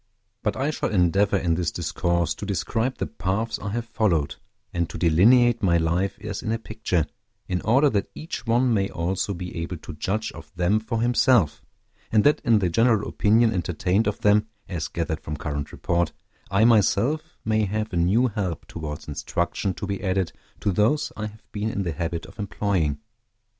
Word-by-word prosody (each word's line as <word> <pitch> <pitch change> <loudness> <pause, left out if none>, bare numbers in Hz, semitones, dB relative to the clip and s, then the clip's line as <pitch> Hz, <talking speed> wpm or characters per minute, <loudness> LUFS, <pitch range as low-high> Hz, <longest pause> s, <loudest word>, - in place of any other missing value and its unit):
But - - -1
I 140 +3 0
shall - - -2
endeavor 100 +1 +3
in 85 -3 +1
this 85 -1 0
discourse 85 -1 0
to - - -10
describe 110 +6 -1
the - - -1
paths 95 +5 -2
I 100 - -4
have 115 +3 -2
followed, 105 -10 0 0.4
and 85 -1 -1
to - - -6
delineate 115 +8 +5
my 85 -3 +4
life 85 +4 0
as 105 -2 -4
in 110 - -2
a 115 - +1
picture, 110 -7 -1 0.4
in 90 -1 -1
order 135 +7 +4
that 100 -2 0
each 160 -6 -6
one 120 +1 +3
may 100 -2 +1
also 95 +3 -2
be 90 0 -6
able 85 +2 -3
to 85 +1 -9
judge 100 +8 -2
of - - -12
them 90 +5 +2
for 110 +1 -2
himself, 120 - +3 0.5
and 110 -2 +4
that 150 - +4
in 115 -5 +4
the 95 -3 +1
general 115 +3 +3
opinion 110 +2 +3
entertained 90 +4 0
of 105 - -2
them, 105 +1 +4 0.2
as 85 -4 -3
gathered 80 -2 -3
from 75 0 -5
current 75 -1 -4
report, 85 -1 0 0.4
I 100 +4 +4
myself 120 +6 +2
may 110 -1 +2
have 105 +1 -3
a - - 0
new 95 +9 +3
help 100 - -2
towards 75 -3 -6
instruction 75 +5 -2
to 105 - -5
be 100 +1 -4
added 95 -4 0 0.3
to 100 - +1
those 110 +11 +2
I 110 - -3
have 110 +1 -15
been 105 +1 -2
in 100 -3 -2
the 85 - -2
habit 85 +2 -3
of - - -15
employing. 95 -7 0
100 Hz, 190 wpm, -25 LUFS, 85-110 Hz, 0.5 s, delineate